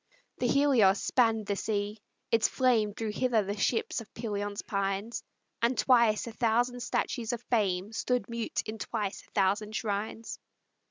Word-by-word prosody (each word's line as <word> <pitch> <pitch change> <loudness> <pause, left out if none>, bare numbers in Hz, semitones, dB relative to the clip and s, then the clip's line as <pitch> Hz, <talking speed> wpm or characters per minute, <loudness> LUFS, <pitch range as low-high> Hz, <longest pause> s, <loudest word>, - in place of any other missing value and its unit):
The 245 - +1
Helios 250 -9 +4
spanned 225 -4 +2
the 200 - -1
sea: 205 +1 -2 0.3
its 230 -1 +4
flame 235 -5 +2
Drew 220 0 -3
hither 230 -1 +1
the 200 +1 -3
ships 225 +3 0
of 220 - -13
Pelion's 205 -3 -3
pines, 200 +3 -2 0.4
And 235 +2 +2
twice 235 -4 +4
a 235 - -6
thousand 240 +2 +1
statues 240 -1 -1
of 240 0 -5
fame 200 -2 +1
Stood 250 +2 0
mute 235 -1 -2
in 215 0 -6
twice 205 0 -3
a - - -24
thousand 205 +2 +1
shrines. 215 +1 -3
220 Hz, 155 wpm, -30 LUFS, 205-235 Hz, 0.4 s, Helios